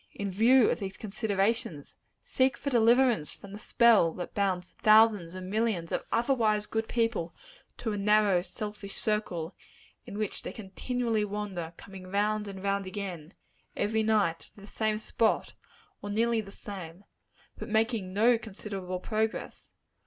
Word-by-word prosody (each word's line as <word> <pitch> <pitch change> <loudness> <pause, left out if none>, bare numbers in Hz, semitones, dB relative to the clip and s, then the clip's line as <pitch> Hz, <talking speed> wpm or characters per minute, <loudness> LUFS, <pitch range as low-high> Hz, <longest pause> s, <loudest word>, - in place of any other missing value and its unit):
in 200 -1 -3
view 230 +5 +5
of - - -2
these 190 -1 -5
considerations, 205 - -1 0.3
seek 260 +1 +1
for 280 - -3
deliverance 235 - +3
from 200 - -13
the 205 - -8
spell 230 -7 +4
that 180 +1 -7
binds 185 -3 -1
thousands 215 -5 +5
and 185 0 -6
millions 205 -5 -1
of - - -1
otherwise 225 -3 +2
good 220 +1 -2
people 225 -8 -1 0.4
to 225 - -3
a 205 - -2
narrow, 205 -2 +4
selfish 210 0 -7
circle, 190 -6 -2 0.5
in 205 -3 -7
which 215 -2 -3
they - - -6
continually 225 +2 -2
wander 200 -5 -4
coming 190 -2 -11
round 210 +2 0
and 195 -1 -8
round 200 -1 0
again, 185 -4 -6 0.4
every 220 +2 +1
night, 210 -7 +2
to - - -16
the - - -11
same 215 0 -1
spot, 220 +1 0 0.5
or 205 - -6
nearly 225 +2 +1
the 200 - -11
same, 190 -3 -9 0.6
but - - -6
making 220 -3 0
no 225 +4 +4
considerable 195 -4 -6
progress? 220 +2 -3
210 Hz, 150 wpm, -29 LUFS, 190-225 Hz, 0.6 s, view